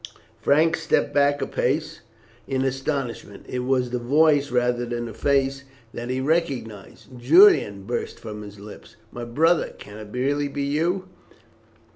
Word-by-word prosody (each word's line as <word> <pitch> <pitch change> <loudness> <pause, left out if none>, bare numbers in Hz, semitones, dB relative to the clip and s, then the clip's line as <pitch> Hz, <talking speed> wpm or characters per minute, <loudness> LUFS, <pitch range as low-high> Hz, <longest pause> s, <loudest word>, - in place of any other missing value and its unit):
Frank 160 +3 +3
stepped 160 -2 0
back 145 0 +2
a - - -1
pace 155 +5 -2 0.5
in 135 -1 -1
astonishment. 135 -6 -4
It 125 - -4
was 125 -1 0
the 125 - -1
voice 145 +3 +3
rather 125 0 +1
than 120 0 -4
the 115 - -7
face 140 -1 0 0.3
that 120 +1 -6
he 130 +1 -1
recognized. 130 - -3
"Julian!" 125 - +5
burst 120 +4 -4
from 105 -2 -8
his 105 -1 -11
lips, 105 +1 -12 0.2
"my 120 0 -6
brother, 160 +8 +1
can 105 +1 -11
it 105 -1 -10
be 125 +2 -2
really 145 +1 0
you?" 170 +7 -1
135 Hz, 150 wpm, -23 LUFS, 120-145 Hz, 0.5 s, Julian